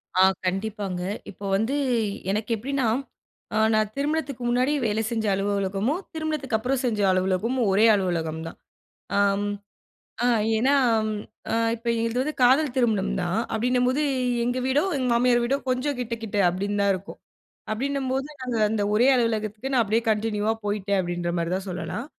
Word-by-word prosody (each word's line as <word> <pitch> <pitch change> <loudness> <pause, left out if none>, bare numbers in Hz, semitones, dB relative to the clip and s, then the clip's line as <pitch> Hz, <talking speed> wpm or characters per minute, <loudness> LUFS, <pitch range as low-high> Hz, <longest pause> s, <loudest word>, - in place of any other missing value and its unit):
ஆ, 185 - +4 0.2
கண்டிப்பாங்க. 195 -1 -2 0.3
இப்போ 200 +1 -10
வந்து, 225 +7 0 0.6
எனக்கு 215 +3 -2
எப்பிடின்னா, 265 +3 -1 0.7
அ - - +2 0.2
நான் 215 -1 +1
திருமணத்துக்கு 285 -3 -2
முன்னாடி 250 +4 +2
வேலை 215 0 +1
செஞ்ச 225 -2 -2
அலுவலகமும், 200 - 0
திருமணத்துக்கு 310 -7 -1
அப்புறம் 250 +4 -1
செஞ்ச 215 -4 0
அலுவலகமும், 190 +7 0
ஒரே 210 +4 +4
அலுவலகம் 165 -5 -1
தான். - - -9 0.6
ஆ, - - +3 1.1
அ - - +3 0.3
ஏன்னா, 260 +5 +3 0.4
ம், 210 -1 -3 0.3
அ - - 0 0.2
இப்ப 235 +1 -10
எங்களுது 230 +2 0
வந்து 305 +2 -3
காதல் 265 +2 +4
திருமணம் 220 -6 +1
தான். 180 +4 0
அப்பிடின்னம்போது 250 +5 +1 0.4
எங்க 245 +1 0
வீடோ, 280 +4 +2
எங்க 255 -2 -1
மாமியார் 240 0 +3
வீடோ 270 +3 +1
கொஞ்சம் 255 +2 0
கிட்ட, 235 -1 -2
கிட்ட 210 -2 -3
அப்பிடின்னு 200 +3 -2
தான் 200 - +3
இருக்கும். 190 +3 -10 0.5
அப்பிடின்னும்போது, 270 +3 -1
நாங்க 250 -2 -2
அந்த 215 -1 -1
ஒரே 240 +4 +4
அலுவலகத்துக்கு 225 +1 -1
நான் 250 - +4
அப்பிடியே 220 +2 0
கன்டினியூவா 215 0 0
போயிட்டேன் 200 -1 0
அப்பிடின்றமாரி 175 -1 -2
தான் 190 +1 -5
சொல்லலாம். 175 +6 -4
225 Hz, 150 wpm, -25 LUFS, 200-255 Hz, 1.1 s, ஆ